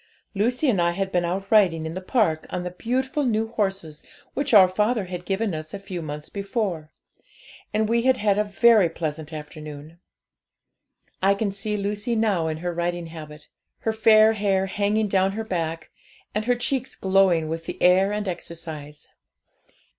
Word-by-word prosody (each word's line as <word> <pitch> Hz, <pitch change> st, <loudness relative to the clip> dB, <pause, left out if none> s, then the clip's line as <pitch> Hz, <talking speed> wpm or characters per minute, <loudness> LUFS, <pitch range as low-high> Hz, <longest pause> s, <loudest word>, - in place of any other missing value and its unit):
'Lucy 245 Hz, +8 st, +1 dB
and 205 Hz, -9 st, +2 dB
I 170 Hz, 0 st, +2 dB
had 195 Hz, +1 st, -2 dB
been 175 Hz, -1 st, +1 dB
out 190 Hz, +3 st, -3 dB
riding 180 Hz, -7 st, +4 dB
in 160 Hz, -, -4 dB
the 185 Hz, -, -5 dB
park 185 Hz, -7 st, 0 dB
on 180 Hz, -, -3 dB
the 180 Hz, -, -4 dB
beautiful 260 Hz, -, -1 dB
new 225 Hz, -3 st, 0 dB
horses 195 Hz, -8 st, -3 dB, 0.3 s
which 280 Hz, -, -1 dB
our 200 Hz, -5 st, +8 dB
father 210 Hz, +3 st, 0 dB
had 180 Hz, -1 st, -7 dB
given 200 Hz, 0 st, -1 dB
us 155 Hz, +3 st, -6 dB
a -, -, -3 dB
few 190 Hz, -3 st, -6 dB
months 150 Hz, -1 st, -6 dB
before, 200 Hz, -6 st, -3 dB, 0.8 s
and 215 Hz, 0 st, +1 dB
we 235 Hz, +1 st, +2 dB
had 260 Hz, +1 st, +3 dB
had 205 Hz, -1 st, +2 dB
a -, -, +3 dB
very 210 Hz, -2 st, +4 dB
pleasant 160 Hz, -1 st, -5 dB
afternoon. 155 Hz, +1 st, -9 dB, 1.2 s
I 195 Hz, +1 st, +4 dB
can 200 Hz, 0 st, -1 dB
see 210 Hz, +2 st, -2 dB
Lucy 205 Hz, +3 st, -2 dB
now 205 Hz, -7 st, +1 dB
in 155 Hz, -1 st, -2 dB
her 175 Hz, -, -1 dB
riding 175 Hz, 0 st, -2 dB
habit 150 Hz, -2 st, -10 dB, 0.3 s
her 225 Hz, -, 0 dB
fair 220 Hz, 0 st, +6 dB
hair 195 Hz, -3 st, +1 dB
hanging 205 Hz, +2 st, 0 dB
down 195 Hz, -1 st, +2 dB
her 225 Hz, +2 st, -3 dB
back, 165 Hz, -5 st, -3 dB, 0.4 s
and 210 Hz, +1 st, -1 dB
her 245 Hz, 0 st, +3 dB
cheeks 255 Hz, +1 st, -2 dB
glowing 190 Hz, -4 st, +3 dB
with 165 Hz, +1 st, -4 dB
the -, -, -5 dB
air 185 Hz, +2 st, +4 dB
and 210 Hz, -1 st, -2 dB
exercise. 160 Hz, -4 st, -7 dB
195 Hz, 175 wpm, -24 LUFS, 170-215 Hz, 1.2 s, our